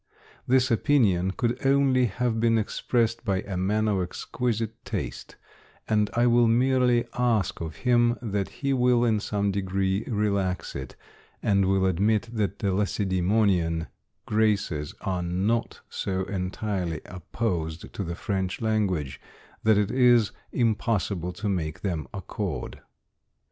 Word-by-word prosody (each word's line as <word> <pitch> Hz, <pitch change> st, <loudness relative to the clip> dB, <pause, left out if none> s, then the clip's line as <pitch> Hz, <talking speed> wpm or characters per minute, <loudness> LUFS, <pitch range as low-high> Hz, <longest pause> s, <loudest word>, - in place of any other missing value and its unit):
This 130 Hz, 0 st, +3 dB
opinion 110 Hz, -, +3 dB
could 120 Hz, +6 st, -2 dB
only 135 Hz, -2 st, +4 dB
have 115 Hz, +1 st, -1 dB
been 115 Hz, 0 st, +3 dB
expressed 115 Hz, +1 st, 0 dB
by 95 Hz, -4 st, 0 dB
a 100 Hz, -, -6 dB
man 105 Hz, +4 st, +1 dB
of 100 Hz, -3 st, +1 dB
exquisite 115 Hz, +4 st, -3 dB
taste, -, -, -5 dB, 0.5 s
and 105 Hz, -1 st, +2 dB
I 120 Hz, +1 st, +3 dB
will 120 Hz, -1 st, +5 dB
merely 125 Hz, 0 st, +3 dB
ask 115 Hz, -10 st, +1 dB
of 80 Hz, -1 st, -5 dB
him 120 Hz, -1 st, +4 dB
that 100 Hz, -5 st, -2 dB
he 140 Hz, -1 st, -2 dB
will 125 Hz, -2 st, +3 dB
in 110 Hz, -2 st, +2 dB
some 100 Hz, -1 st, -1 dB
degree 95 Hz, +1 st, -1 dB
relax 100 Hz, -5 st, -1 dB
it, 65 Hz, -2 st, -6 dB, 0.5 s
and 100 Hz, -2 st, +3 dB
will 95 Hz, 0 st, +2 dB
admit 105 Hz, +5 st, +1 dB
that 105 Hz, -3 st, -1 dB
the 100 Hz, -2 st, 0 dB
Lacedemonian 95 Hz, -4 st, +1 dB, 0.4 s
graces 105 Hz, -9 st, 0 dB
are 95 Hz, -2 st, -2 dB
not 95 Hz, +7 st, -1 dB
so 95 Hz, -1 st, -2 dB
entirely 90 Hz, -3 st, -3 dB
opposed 90 Hz, -3 st, -4 dB
to 100 Hz, -, -3 dB
the 85 Hz, -1 st, -4 dB
French 95 Hz, -2 st, -2 dB
language, 100 Hz, -, -1 dB, 0.4 s
that 110 Hz, -1 st, +4 dB
it 105 Hz, 0 st, +1 dB
is 120 Hz, -4 st, +4 dB, 0.2 s
impossible 105 Hz, -6 st, 0 dB
to 105 Hz, +2 st, -4 dB
make 80 Hz, -6 st, -2 dB
them 85 Hz, -8 st, -2 dB
accord. 95 Hz, -, -5 dB
105 Hz, 135 wpm, -26 LUFS, 95-115 Hz, 0.5 s, will